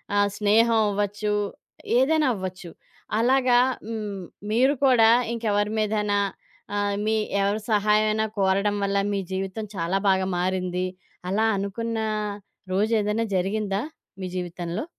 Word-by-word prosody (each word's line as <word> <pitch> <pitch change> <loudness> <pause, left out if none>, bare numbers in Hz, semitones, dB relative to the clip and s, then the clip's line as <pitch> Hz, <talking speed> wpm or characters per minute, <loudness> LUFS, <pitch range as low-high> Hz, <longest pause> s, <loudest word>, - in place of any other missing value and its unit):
ఆహ్, 205 0 +3
స్నేహం 225 +2 +4
అవ్వచ్చు. 205 +1 -1 0.7
ఏదైనా 305 +3 +3
అవ్వచ్చు. 185 -2 -6 0.5
అలాగా 250 0 +4 0.3
హ్మ్, 210 -4 -4 0.3
మీరు 260 +5 +4
కూడా 230 -4 +6 0.2
ఇంకెవరి 210 -2 0
మీదైనా 210 -1 +1 0.6
ఆహ్, 205 0 0
మీ 220 - +2 0.3
ఎవరి 205 +2 0
సహాయమన్నా 215 +1 +2
కోరడం 195 +2 +2
వల్ల 200 0 0 0.2
మీ 200 - 0
జీవితం 195 +3 -3
చాలా 180 +2 0
బాగా 190 0 +2
మారింది. 185 0 -1 0.4
అలా 215 +4 +2
అనుకున్న 225 +4 -3 0.7
రోజేదైనా 210 +2 +1
జరిగిందా 200 +2 -1 0.4
మీ - - -3
జీవితంలో? 175 - -4
205 Hz, 110 wpm, -25 LUFS, 195-220 Hz, 0.7 s, కూడా